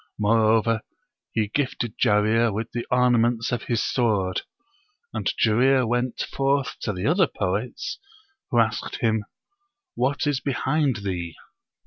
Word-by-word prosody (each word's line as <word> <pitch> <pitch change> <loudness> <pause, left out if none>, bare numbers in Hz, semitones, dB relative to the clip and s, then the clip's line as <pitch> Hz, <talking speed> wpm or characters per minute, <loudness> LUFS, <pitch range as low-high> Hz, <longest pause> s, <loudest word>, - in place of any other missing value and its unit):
Moreover, 110 +1 +3 0.5
he 110 -2 0
gifted 120 -3 -2
Jarir 110 +3 +3
with 110 +3 -4
the 120 - -4
ornaments 120 -2 +2
of 120 - -2
his 115 -2 0
sword; 100 -7 0 0.7
and - - -1
Jarir 125 +3 +3
went 120 +1 -1
forth 135 0 0
to 110 - -2
the 90 0 -4
other 175 +3 +4
poets, 120 - -3 0.5
who 120 - 0
asked 115 -1 +1
him, 110 -2 0 0.7
"What 140 +4 0
is 145 -2 +1
behind 135 -3 0
thee?" 85 -4 -3
115 Hz, 125 wpm, -24 LUFS, 110-130 Hz, 0.7 s, other